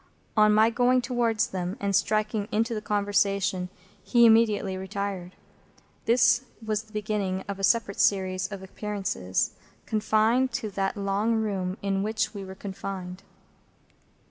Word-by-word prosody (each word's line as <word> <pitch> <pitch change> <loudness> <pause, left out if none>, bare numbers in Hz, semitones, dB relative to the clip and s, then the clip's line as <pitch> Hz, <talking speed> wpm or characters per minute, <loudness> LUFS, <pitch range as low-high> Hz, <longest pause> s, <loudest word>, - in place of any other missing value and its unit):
On 215 -1 +5
my 220 +2 +5
going 250 +2 +3
towards 240 -3 +1
them, 185 +2 -4
and 200 -2 0
striking 215 +1 +1
into 230 +2 0
the 215 - -3
conversation, 200 -3 0 0.3
he 235 -1 +5
immediately 220 -4 +4
retired. 190 -1 -5 0.7
This 240 +1 +4
was 215 -1 -2
the 220 0 -22
beginning 205 -3 -2
of 200 -1 -5
a - - -6
separate 200 +1 +2
series 185 -1 +2
of 195 -1 -7
appearances, 190 - -2 0.3
confined 220 +4 +2
to 220 -3 -3
that 195 +1 -2
long 200 +3 0
room 195 -4 -2
in 195 -1 0
which 220 +1 -1
we 200 -2 -6
were 190 0 -9
confined. 190 -1 -6
205 Hz, 140 wpm, -27 LUFS, 195-220 Hz, 0.7 s, On